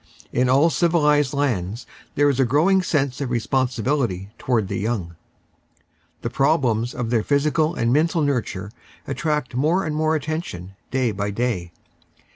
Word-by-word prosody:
In 125 +1 +2
all 140 +6 +4
civilised 150 -6 +3
lands 120 -7 -1 0.3
there 145 +1 +4
is 140 -2 +1
a - - +5
growing 160 - +3
sense 140 -7 -1
of 135 - -2
responsibility 120 -4 -1
towards 115 -6 0
the 100 - -3
young. 100 -6 -3 1.1
The 115 - -1
problems 130 -5 +1
of 120 -2 -3
their 115 -3 +3
physical 150 +5 +1
and 115 -2 +1
mental 160 +2 +2
nurture 115 -8 -2 0.3
attract 150 -3 -2
more 155 +9 +1
and 155 -1 -2
more 155 +1 +1
attention 155 - -4 0.2
day 130 -3 +1
by 105 0 -3
day. 100 -5 -2
130 Hz, 145 wpm, -22 LUFS, 115-150 Hz, 1.1 s, a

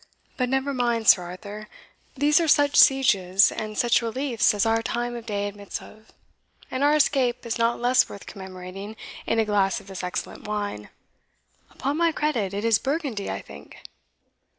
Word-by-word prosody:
But 250 -1 -1
never 265 +2 0
mind, 235 -3 0
Sir 180 - +7
Arthur 200 +4 -8 0.5
these 295 +4 +3
are 335 - 0
such 290 -1 +3
sieges 200 -8 +5
and 215 -1 -6
such 240 0 +3
reliefs 235 0 +1
as 205 - +1
our 225 0 +2
time 240 +1 -3
of 235 -1 -8
day 205 -1 -2
admits 205 0 -7
of 215 +1 -16 0.6
and 260 +2 -1
our 295 +1 +4
escape 260 -5 +1
is 230 0 -3
not 230 +1 +1
less 245 +2 +3
worth 200 - -10
commemorating 190 +2 -9 0.3
in 225 - +1
a 225 - +3
glass 205 -1 +1
of 200 - -16
this 190 -1 -8
excellent 180 +3 -5
wine 205 - -4 0.8
Upon 280 +3 -3
my 335 0 +3
credit, 255 -12 -1
it 205 +2 -3
is 225 -3 +3
Burgundy, 275 -8 -3
I 95 - -4
think." 70 +1 -13
225 Hz, 175 wpm, -24 LUFS, 200-260 Hz, 0.8 s, Sir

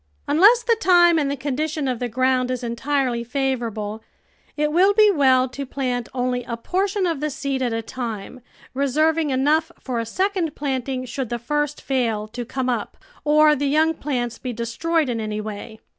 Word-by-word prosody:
Unless 410 +12 +5
the 465 -1 +3
time 345 -4 +5
and 285 -2 0
the 280 - -1
condition 290 +2 -2
of 250 -3 -1
the 245 - -2
ground 255 +1 +1
is 255 -1 -3
entirely 245 0 -1
favourable, 235 -5 -2 0.6
it 300 0 +1
will 380 +5 +4
be 425 -1 +6
well 260 -6 +4
to 275 +2 -6
plant 250 -3 -3
only 250 -1 -1
a 235 -1 -4
portion 385 - -1
of 330 -5 -1
the 305 +1 -1
seed 275 -1 -3
at 245 -2 0
a 225 0 -2
time, 230 0 -6 0.3
reserving 305 +4 +1
enough 295 +5 +2
for 250 -3 -3
a 230 - -2
second 370 - -1
planting 260 -2 -2
should 255 0 -4
the 240 - -2
first 295 +4 -2
fail 230 -6 -1
to 240 +2 -5
come 260 +2 -3
up 240 -4 -2 0.3
or 300 +1 +5
the 285 0 -1
young 315 +3 +3
plants 245 -6 -3
be 255 - -4
destroyed 265 +8 -1
in 235 -2 -2
any 215 -1 -3
way. 215 +1 -7
265 Hz, 185 wpm, -22 LUFS, 240-305 Hz, 0.6 s, be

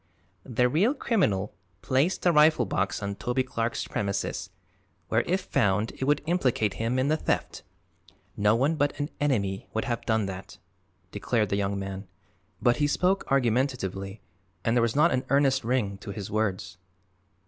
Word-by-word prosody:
"The 125 0 +2
real 195 - +2
criminal 110 - 0 0.3
placed 135 +8 +1
the 175 - +5
rifled 150 - +4
box 95 +3 -1
on 100 0 -2
Toby 125 +5 -1
Clark's 115 -2 -2
premises, 100 -1 -2 0.6
where - - +3
if 185 +2 +1
found 105 +2 +1
it 130 - -4
would 145 +1 +2
implicate 130 - +1
him 115 +3 0
in 130 +1 +1
the 155 +2 +2
theft. - - -2 0.7
No 105 +2 +3
one 140 +7 +1
but 145 0 0
an 145 +1 -2
enemy 100 -10 0
would 110 - 0
have 120 -2 -2
done 110 -2 +2
that," 95 0 -7 0.5
declared 110 -4 0
the - - 0
young 100 0 -1
man, 95 0 -5 0.5
but 120 -1 +3
he 145 - +2
spoke 185 +6 +1
argumentatively 115 -6 0 0.4
and 115 - +2
there 120 - +4
was 115 -1 +1
not 155 +4 +4
an 130 0 0
earnest 135 -1 +3
ring 110 -5 -1
to 100 - -9
his 100 -1 -6
words. 100 -4 -2
120 Hz, 165 wpm, -27 LUFS, 100-140 Hz, 0.7 s, the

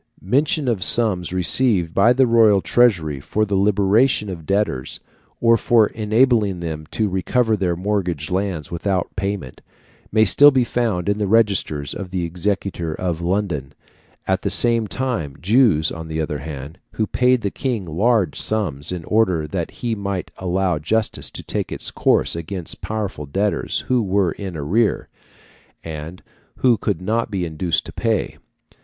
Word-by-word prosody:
Mention 140 - +1
of 110 -7 0
sums 95 -8 +1
received 90 -1 +2
by 115 +5 +4
the 130 +1 +4
royal 115 -4 +5
treasury 85 - +2
for 105 +9 -1
the 100 - -4
liberation 105 +4 +2
of 85 -5 -8
debtors, 100 -11 -1 0.4
or 115 0 +4
for 115 -3 +3
enabling 110 -3 +2
them 80 -2 -5
to 110 - -1
recover 110 +5 +1
their 90 -4 -1
mortgaged 90 -4 -2
lands 90 -5 -2
without 90 +1 -2
payment, 100 -9 -4 0.5
may 110 0 +4
still 145 +8 +7
be 130 -3 +2
found 115 -7 -1
in 100 +1 0
the 105 - 0
registers 100 - +1
of 95 -2 -6
the 90 -1 -2
Exchequer 90 -2 -2
of 85 -2 -3
London; 85 -7 -2 0.5
at 95 0 0
the - - -1
same 115 -2 +3
time, 95 - -3
Jews, 100 - +3
on 80 0 -7
the 80 0 -4
other 75 -2 -2
hand, 75 +2 -8 0.2
also 110 - 0
paid 125 +2 +2
the 100 - -2
King 120 -8 -3
large 100 +5 +1
sums, 90 -11 -2
in 90 -2 -4
order 95 -8 +1
that 85 +2 -3
he 120 -2 -4
might 100 -3 -4
allow 90 -2 0
justice 110 +8 -1
to - - -9
take - - -3
its - - -4
course - - +1
against 85 +1 -6
powerful 100 -9 -4
debtors 100 +8 -1
who 125 -1 +1
were 95 -3 +1
in 95 -3 -6
arrear, 100 +10 0 0.7
and 80 +2 -7 0.3
who 125 -2 +3
could 105 -3 -3
not 115 +4 0
be 95 -4 -2
induced 80 0 -1
to - - -9
pay. 110 -3 -1
95 Hz, 160 wpm, -20 LUFS, 85-110 Hz, 0.7 s, still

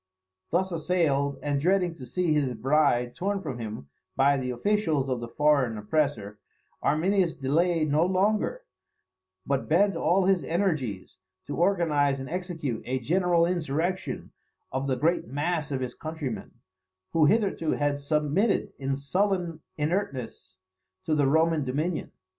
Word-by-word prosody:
Thus 185 +2 +1
assailed, 155 -5 +1
and 145 -1 0
dreading 180 +1 +2
to 130 - -9
see 180 -4 0
his 145 -4 +1
bride 125 -1 +2
torn 200 +6 -1
from 140 -10 -5
him 110 -9 -6 0.3
by 140 +1 +4
the 130 -2 -2
officials 155 - 0
of 130 -2 -1
the 120 - -5
foreign 140 -4 +2
oppressor, 105 -3 -1 0.4
Arminius 175 +3 +2
delayed 155 +3 +1
no 155 +3 +4
longer, 200 +3 +1 0.8
but 140 -1 -1
bent 195 +4 +3
all 175 +3 +2
his 190 -2 +3
energies 150 - -2 0.3
to 145 - -4
organize 160 -7 +2
and 135 +2 -7
execute 165 -9 -3
a 130 +1 0
general 175 +3 +2
insurrection 175 +2 -2 0.4
of 135 +1 -2
the 130 -2 0
great 160 +2 +1
mass 150 +4 -1
of 135 -2 -2
his 125 -1 -3
countrymen, 150 - -5 0.6
who 165 -2 +4
hitherto 195 -4 +1
had 145 -1 0
submitted 150 +8 +1
in 135 0 -1
sullen 175 +3 -1 0.2
inertness 135 - -3 0.5
to 160 - 0
the 145 -2 +3
Roman 160 +1 +3
dominion. 150 +6 -2
150 Hz, 140 wpm, -27 LUFS, 135-175 Hz, 0.8 s, by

